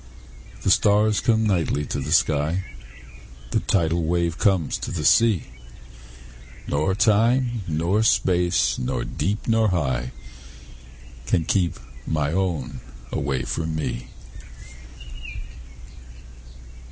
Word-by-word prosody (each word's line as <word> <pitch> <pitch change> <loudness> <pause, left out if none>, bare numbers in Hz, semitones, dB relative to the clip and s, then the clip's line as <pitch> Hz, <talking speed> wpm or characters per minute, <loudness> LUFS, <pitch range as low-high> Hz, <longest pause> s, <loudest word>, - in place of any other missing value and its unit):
The - - +3
stars 105 +1 +3
come 110 -1 +2
nightly 85 -7 0
to - - -3
the 70 +2 -4
sky, 80 +2 +2 0.9
The - - +2
tidal 85 -2 +1
wave 85 +1 0
comes 95 -7 +1
to - - -5
the 75 -4 -3
sea; 115 -6 +4 1.2
Nor 75 +6 0
time, 115 +3 +2
nor 85 +6 +1
space, 90 -5 +2
nor 65 - -2
deep, 100 +8 -3
nor 115 -1 +3
high, 65 -9 -1 1.2
Can 80 - +1
keep 90 +1 0 0.3
my 75 -2 0
own 85 -9 -2 0.3
away 70 -2 -1
from 80 +5 -3
me. 75 -5 -4
85 Hz, 105 wpm, -23 LUFS, 75-105 Hz, 1.2 s, sea